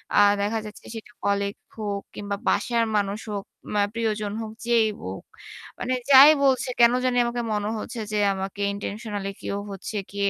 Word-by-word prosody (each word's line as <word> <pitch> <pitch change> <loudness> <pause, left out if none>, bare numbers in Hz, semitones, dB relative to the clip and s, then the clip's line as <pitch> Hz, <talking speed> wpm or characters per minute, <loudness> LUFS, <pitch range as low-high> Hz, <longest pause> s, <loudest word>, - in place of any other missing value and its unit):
আ - - +6 0.2
দেখা 215 +2 0
যাচ্ছে 210 - -11
সেটা 225 +2 -9
কলিগ 200 0 +1 0.2
হোক 205 -2 -3
কিংবা 205 0 -3
বাসার 235 -1 +2
মানুষ 200 0 -1
হোক, 200 -1 -4 0.3
মা 205 - +3
প্রিয়জন 215 -2 -1
হোক, 220 -1 -6 0.2
যেই 230 -2 +4 0.2
হোক। 95 +1 -6 0.6
মানে 255 +1 -1 0.2
যাই 275 +3 +11
বলছে 265 -1 +2
কেনো 235 +1 +6
জানি 250 -1 +1
আমাকে 240 0 -2
মনে 210 0 -1
হচ্ছে 230 - -6
যে 210 - 0 0.2
আমাকে 195 +1 -5
ইনটেনশনালই 205 -1 -4
কেউ 200 - -3
হচ্ছে 195 +2 -7 0.2
গিয়ে 200 0 0
210 Hz, 170 wpm, -25 LUFS, 200-235 Hz, 0.6 s, যাই